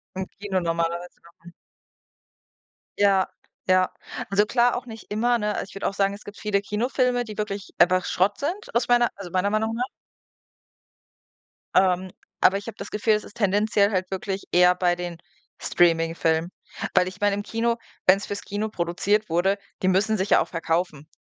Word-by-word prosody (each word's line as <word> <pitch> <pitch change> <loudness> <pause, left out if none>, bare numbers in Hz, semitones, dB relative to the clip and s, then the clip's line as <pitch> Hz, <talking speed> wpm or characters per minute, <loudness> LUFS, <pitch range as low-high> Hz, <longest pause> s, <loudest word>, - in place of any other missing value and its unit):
Im 190 0 -3
Kino 195 -2 -3
normalerweise 170 +1 -2
kommen. 170 0 -17 1.5
Ja, 195 -2 +4 0.4
ja. 185 0 +3 0.4
Also, 205 +2 +3
klar 240 +2 +2
auch 245 +1 -4
nicht 225 -3 -11
immer, 240 +3 +2
ne? 210 -1 -1
Also, - - -2
ich - - -15
würde 195 - -2
auch - - -2
sagen, 195 0 +1
es 200 - -10
gibt 205 0 -10
viele 205 -2 0
Kinofilme, 245 +4 0
die 215 -2 -9
wirklich 205 -2 -4
einfach 185 +1 +4
Schrott 195 +4 +1
sind 360 +10 -4
aus 235 - +2
meiner 240 -1 +4
also, 190 -4 -9
meiner 185 +2 +1
Meinung 220 +2 0
nach. 245 +2 0 1.9
Ähm, 185 0 +3 0.3
aber 195 - +5
ich 200 +3 -8
habe 220 - -7
das 200 - -7
Gefühl, 215 +1 +2
es 210 - 0
ist 205 - -14
tendenziell 205 0 +2
halt 185 -2 -1
wirklich 195 0 -3
eher 180 0 +5
bei 180 -1 +2
den 175 -1 -5 0.4
Streaming-Filmen, 165 0 +2 0.4
weil 180 - +4
ich 190 +3 -9
meine 205 -1 +3
im 205 - -4
Kino 230 +2 0 0.3
wenn 185 +1 +7
es 200 - -6
fürs 200 0 -5
Kino 210 +2 -3
produziert 200 +3 0
wurde, 185 +4 +2 0.2
die 185 - +1
müssen 210 +4 +2
sich 190 +1 -2
ja - - +6
auch - - -2
verkaufen. 165 -3 -2
200 Hz, 180 wpm, -24 LUFS, 180-215 Hz, 1.9 s, wenn